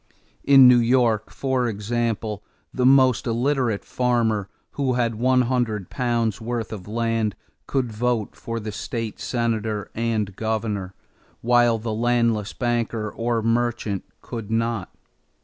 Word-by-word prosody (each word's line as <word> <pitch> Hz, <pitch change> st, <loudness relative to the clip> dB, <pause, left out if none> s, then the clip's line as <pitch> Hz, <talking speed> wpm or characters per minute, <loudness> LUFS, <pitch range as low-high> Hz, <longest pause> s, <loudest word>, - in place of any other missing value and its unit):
In 135 Hz, -2 st, +8 dB
New 125 Hz, -1 st, +7 dB
York, 115 Hz, -3 st, +2 dB
for 130 Hz, -2 st, -1 dB
example, 110 Hz, -1 st, -2 dB, 0.3 s
the 125 Hz, -1 st, +2 dB
most 130 Hz, -3 st, +4 dB
illiterate 120 Hz, -2 st, 0 dB
farmer 115 Hz, -5 st, 0 dB, 0.2 s
who 135 Hz, -3 st, 0 dB
had 120 Hz, -2 st, +1 dB
one 125 Hz, +3 st, +3 dB
hundred 115 Hz, -6 st, -1 dB
pounds' 115 Hz, -4 st, 0 dB
worth 115 Hz, 0 st, -3 dB
of 100 Hz, -3 st, -8 dB
land 115 Hz, -1 st, -1 dB, 0.3 s
could 130 Hz, -4 st, -1 dB
vote 115 Hz, -1 st, -1 dB
for 115 Hz, 0 st, -5 dB
state 115 Hz, 0 st, -5 dB
senator 110 Hz, -3 st, -2 dB
and 110 Hz, -4 st, -1 dB
governor, 110 Hz, -4 st, -2 dB, 0.5 s
while 120 Hz, -1 st, +4 dB
the 110 Hz, 0 st, -4 dB
landless 115 Hz, -2 st, +1 dB
banker 115 Hz, -3 st, -1 dB
or 115 Hz, -1 st, -1 dB
merchant 115 Hz, -3 st, 0 dB, 0.2 s
could 115 Hz, -3 st, -6 dB
not. 115 Hz, -3 st, -1 dB
115 Hz, 125 wpm, -23 LUFS, 110-120 Hz, 0.5 s, In